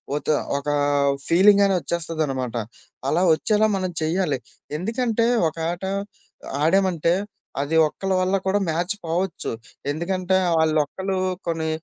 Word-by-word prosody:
ఒత 150 - -4 0.3
ఒకా 145 +1 -2 0.5
ఫీలింగని 200 +3 +5
ఒచ్చేస్తదనమాట. 155 -6 -2 0.5
అలా 155 +6 +2
ఒచ్చేలా 215 +5 +2
మనం 185 -1 -2
చెయ్యాలి. 160 -3 0 0.4
ఎందుకంటే, 230 +4 0 0.2
ఒక 160 - -6
ఆట 175 +2 -7 0.8
ఆడామంటే, 175 -1 +3 0.5
అది 145 +3 -1
ఒక్కళ్ళ 190 +5 -2
వల్ల 185 +1 +1
కూడా 200 +2 +2
మ్యాచ్ 175 +5 0
పోవచ్చు. 170 +1 -2 0.4
ఎందుకంటే, 185 +4 0 0.2
ఆళ్ళొక్కలూ 160 +5 0 0.3
కొన్ని 160 -1 -1
175 Hz, 105 wpm, -23 LUFS, 155-195 Hz, 0.8 s, ఫీలింగని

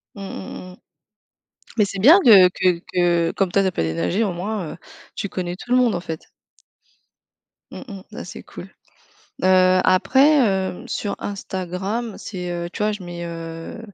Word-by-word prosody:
Mmh, 200 - -9
mmh, 190 -1 -8
mmh. 180 - -16 1.0
Mais 210 - +4
c'est 195 -1 -5
bien 305 - +8
que 200 - +8
que 180 -1 +1
que 175 -2 +2
comme 190 -3 0
toi 200 - +3
tu 190 - +2
as - - -3
pas - - -1
déménagé 85 - 0
au 190 - -1
moins, 185 -1 -4
heu, - - -9 0.4
tu 200 - -4
connais 175 -1 -4
tout 240 - -12
le 250 - +4
monde 245 -3 +3
en 175 - -2
fait. 165 -2 -6 1.5
Mmh, - - -8
mmh 200 -3 -8
ça - - -7
c'est - - -9
cool. - - -11 0.7
Heu, 185 0 +5
après, 275 +10 +4 0.3
heu, - - -11
sur 205 - -3
Instagram, 195 +3 -4
c'est, 180 -4 -6
heu, 175 0 -3
tu - - -8
vois, 215 0 +1
je 205 -2 -7
mets, 175 -1 -7
heu, 165 +4 -7
185 Hz, 180 wpm, -21 LUFS, 175-210 Hz, 1.5 s, bien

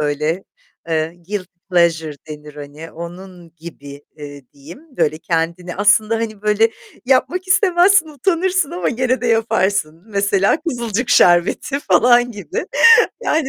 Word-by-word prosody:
böyle 150 +4 -2 0.4
eee 160 -1 0 0.2
guilty 195 -3 -5 0.2
pleasure 165 -4 +1
denir, 150 -1 -10
hani, 150 +2 -10
onun 175 0 -11
gibi, 145 -4 -11
eee, 145 -2 -10
diyeyim 175 - -15
böyle 155 +1 0
kendini 170 +2 -3
aslında, 210 +2 +3
hani, 215 -2 -5
böyle 210 +2 +2 0.4
yapmak 360 +8 0
istemezsin 370 -2 +3
utanırsın 355 +3 -1
ama 175 -2 -2
gene 255 +1 -1
de 245 - -3
yaparsın 200 -7 0
mesela 200 +3 +1
Kızılcık 240 - -3
Şerbeti 175 +10 +2
falan 245 -2 +3
gibi 365 - -6 0.6
yani, 310 - 0
200 Hz, 125 wpm, -18 LUFS, 165-250 Hz, 0.6 s, aslında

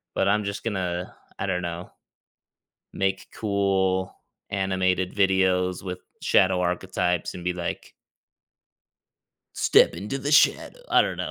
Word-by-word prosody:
but 95 - +1
I'm 105 +1 +2
just 100 +1 -4
gonna, 90 -5 -3 0.2
I 95 - -3
don't 90 -2 -1
know 85 0 -6 1.0
make 95 -1 -1
cool 95 -3 0 0.4
animated 95 -1 0
videos 95 -2 +2
with 90 -1 -5 0.2
shadow 95 -1 +3
archetypes 90 -1 -1
and 90 - -8
be 90 +1 0
like 90 -1 -5 1.6
"Step - - +4
into 105 +10 -4
the 145 +2 -2
shadow." 325 - +3
I - - +6
don't - - 0
know. - - -4
95 Hz, 125 wpm, -25 LUFS, 90-95 Hz, 1.6 s, I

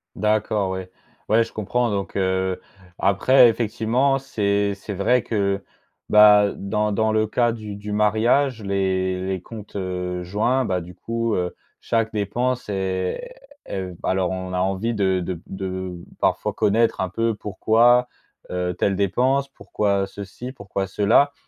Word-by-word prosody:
D'accord, 105 -2 0
ouais. 95 -1 -5 0.4
Ouais, 115 +2 +5
je 115 - -10
comprends 120 +3 -1
donc, 100 -1 -3
heu, 95 -1 0 0.4
après 120 +6 +5
effectivement 120 +4 +1
c'est 100 -6 0
c'est 100 +1 -7
vrai 120 +6 +2
que, 100 -3 0 0.5
bah, 105 -1 +7
dans 105 +1 -1
dans 110 +1 +1
le 110 0 +2
cas 120 +2 +2
du 105 -3 -7
du 105 +1 -7
mariage, 110 +4 +2
les 95 -1 -1
les 95 -2 -2
comptes, 105 +1 -11
heu, 90 -2 -3
joints, 110 +8 +1
bah, 95 -6 0
du 90 +1 -10
coup, 115 -1 -2
heu, 90 0 -1 0.3
chaque 115 -1 0
dépense 120 +4 -1
est 95 - -3 0.3
est 95 -2 -4
alors 95 -1 0
on 95 0 -4
a 90 - 0
envie 95 +5 0
de 95 -3 +1
de 90 +1 -3
b 85 - -10
de 95 -1 -5 0.3
parfois - - +1
connaître 115 +3 +2
un 95 - -1
peu 115 +4 0
pourquoi, 115 +4 +3 0.4
heu, 90 0 -2
telle 100 +2 0
dépense, 130 +8 +1
pourquoi 100 -3 -1
ceci, 100 +6 -8
pourquoi 100 -4 -4
cela. 110 +9 +3
100 Hz, 150 wpm, -23 LUFS, 95-115 Hz, 0.5 s, bah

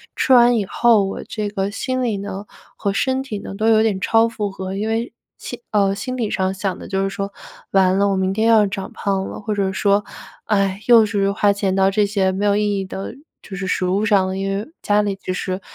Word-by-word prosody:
吃 - - 0
完 245 -1 +7
以 210 -3 0
后 225 +1 +3
我 195 - -4
这 210 -2 -4
个 195 -1 -2
心 255 +5 -3
里 235 -4 0
呢 200 0 -6 0.3
和 200 - -1
身 260 +5 0
体 220 -6 -5
呢 195 - -8
都 215 +1 0
有 220 -1 +5
点 210 -4 0
超 225 +3 +3
负 215 -3 -3
荷， 190 -1 -6
因 210 +2 -2
为 225 +2 -2 0.3
心 245 - -7
呃， 200 -2 +2
心 255 +5 -5
理 225 -4 -2
上 190 0 0
想 190 -1 -3
的 - - -9
就 195 -1 -1
是 195 - 0
说- 200 0 -4 0.4
完 190 -1 +4
了， 200 - +3
我 195 - +1
明 190 0 0
天 220 +3 +1
要 220 -2 +5
长 195 -1 -5
胖 195 -1 -2
了， - - -7
或 210 0 -3
者 195 -2 0
说- 200 +1 +2 0.4
唉， 195 -2 0
又 230 -3 +7
是 200 -2 0
花 205 0 +2
钱 195 -2 -1
到 195 0 +3
这 205 +1 +2
些 195 -2 +1
没 190 +2 -3
有 205 -1 +3
意 205 -1 0
义 - - -2
的 190 +3 -6 0.3
就 195 - -8
是 195 -1 -4
食 185 - 0
物 190 +3 +1
上， 195 -3 +2
因 195 +1 -2
为 205 - -5
家 210 0 +2
里 200 -1 -1
就 190 - -5
是 185 0 -3
200 Hz, 260 characters per minute, -20 LUFS, 195-215 Hz, 0.4 s, 完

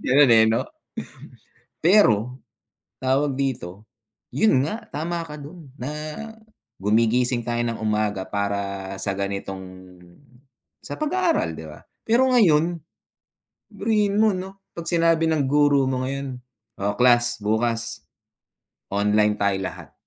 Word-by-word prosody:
ganun, 140 0 +4
eh, 110 -1 +7
'no? 110 +1 +1 1.2
Pero, 125 - +3 0.6
tawag 135 +1 +1
dito, 105 -8 -3 0.5
'yun 175 -12 +3
nga, 215 +10 -5
tama 170 +4 -3
ka 150 - -8
do'n 150 +2 -11
na 125 +3 -5 0.9
gumigising 115 +4 +2
tayo 120 0 -1
ng 115 -1 -3
umaga 105 -2 0
para 100 -1 -3
sa 100 - -1
ganitong 100 -1 -4 1.2
sa - - -6
pag-aaral, 335 +3 +1
'di - - -8
ba? - - -13 0.2
Pero 235 +4 +4
ngayon, 170 -7 +3 0.9
biruhin 210 -2 +1
mo 220 -3 +4
'no, 190 +1 -7 0.2
'pag 170 - -5
sinabi 165 -1 +3
ng 150 -4 +1
guro 145 -1 +3
mo 130 -1 -1
ngayon, 135 0 -4 0.5
"O 100 +1 +1
class, 120 -1 +4
bukas 115 +2 -1 0.9
online 105 +1 +2
tayo 100 -1 +1
lahat." 90 -5 -7
125 Hz, 120 wpm, -23 LUFS, 105-165 Hz, 1.2 s, eh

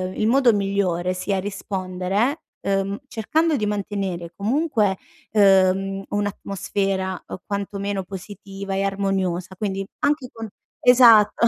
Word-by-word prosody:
il 215 - +1
modo 250 0 +5
migliore 195 -3 0
sia 190 +1 -1
rispondere, 195 - -2 0.2
uhm, 195 0 -1
cercando 315 +8 +1
di 215 -6 -1
mantenere 195 -4 -3
comunque, 215 - +1 0.3
uhm, 195 -1 +3
un'atmosfera, 195 -2 -2
uhm, - - -6
quantomeno 200 -1 -3
positiva 195 +1 -7
e 195 - 0
armoniosa, 195 -2 -1
quindi 195 -1 -3
anche 290 -3 +1
con 225 -1 -7 0.4
esatto, 235 -3 +7
200 Hz, 110 wpm, -23 LUFS, 190-210 Hz, 0.4 s, esatto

